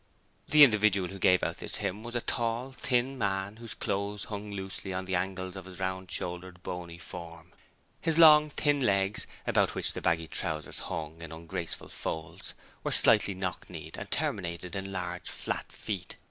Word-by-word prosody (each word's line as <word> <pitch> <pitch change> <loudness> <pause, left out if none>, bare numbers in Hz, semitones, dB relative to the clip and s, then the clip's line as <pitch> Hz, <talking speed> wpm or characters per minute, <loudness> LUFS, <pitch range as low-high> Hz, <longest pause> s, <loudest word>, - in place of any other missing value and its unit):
The 150 -1 +9
individual 105 -7 +4
who 95 - -8
gave 90 -1 +4
out - - -1
this - - -1
hymn 100 +4 -2
was 120 +1 -6
a 120 - +1
tall, 120 +3 -1
thin 130 0 0
man 100 0 -1
whose 115 -2 -5
clothes 100 0 -2
hung 105 0 -6
loosely 95 -1 -5
on 95 0 -3
the 95 - -4
angles 95 0 -2
of 95 -1 -8
his 95 -1 -10
round 95 0 -2
shouldered, 90 +1 -4
bony 85 -1 -6
form. 85 0 -9 0.5
His 165 -1 +1
long, 150 -2 +9
thin 145 0 +1
legs 100 -3 +2 0.2
about - - +2
which - - +1
the - - -5
baggy 80 -1 +1
trousers 80 -3 -2
hung 80 0 -5
in 85 -1 -7
ungraceful 80 +1 -5
folds 80 0 -5 0.3
were - - -1
slightly 100 - +7
knock 90 -1 -4
kneed, - - -8
and - - -7
terminated 85 +1 -2
in 95 0 -4
large, 90 -1 -4
flat - - -3
feet. 95 -4 -5
95 Hz, 175 wpm, -30 LUFS, 90-110 Hz, 0.5 s, The